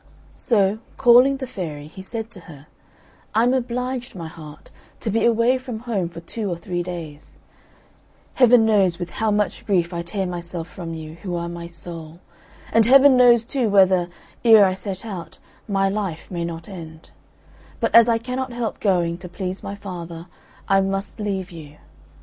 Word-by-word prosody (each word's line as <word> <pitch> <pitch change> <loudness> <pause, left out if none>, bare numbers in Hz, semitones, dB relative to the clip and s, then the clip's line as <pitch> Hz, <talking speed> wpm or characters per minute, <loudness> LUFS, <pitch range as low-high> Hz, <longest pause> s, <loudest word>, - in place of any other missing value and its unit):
So, 205 -2 +1 0.2
calling 255 +2 +6
the 265 - -5
fairy, 155 - -6
he 160 +5 -11
said 225 +3 -5
to 200 - -11
her, 145 -2 -12 0.7
"I 225 - +4
am 245 +1 +3
obliged, 250 0 -3
my 170 -3 -6
heart, 155 -2 -12 0.3
to 220 - -2
be 225 - +1
away 235 +2 +3
from 250 -4 -7
home 210 -8 -2
for 170 0 -10
two 205 +4 -4
or 175 - -3
three 175 +1 -3
days; 165 -4 -8 1.0
Heaven 245 -3 +6
knows 195 -6 +3
with 175 0 -6
how 220 0 -1
much 210 +2 0
grief 185 -5 0
I 170 - -2
tear 190 +3 -3
myself 175 -1 -5
from 165 -1 -7
you, 155 -1 -8
who 180 -2 -4
are 170 0 -3
my 170 0 -7
soul; 170 -1 -10 0.5
and 225 -1 +5
Heaven 275 +1 +7
knows 240 -2 +6
too 250 -3 0
whether, 185 -3 +4 0.3
ere 220 -3 +8
I 185 - +1
set 190 +1 -5
out, 190 -6 -7 0.3
my 195 -2 +1
life 195 -5 -4
may 170 -2 -2
not 165 -1 -6
end; 160 -4 -10 0.7
but - - -1
as 230 0 +8
I 230 - +3
cannot 250 +3 -4
help 235 -2 -3
going, 175 -4 +1
to 180 -1 -9
please 185 +1 -5
my 200 - -6
father, 175 -4 -8 0.4
I 195 0 +4
must 195 +2 -3
leave 195 -3 -3
you. 150 -3 -11
195 Hz, 180 wpm, -22 LUFS, 170-230 Hz, 1.0 s, ere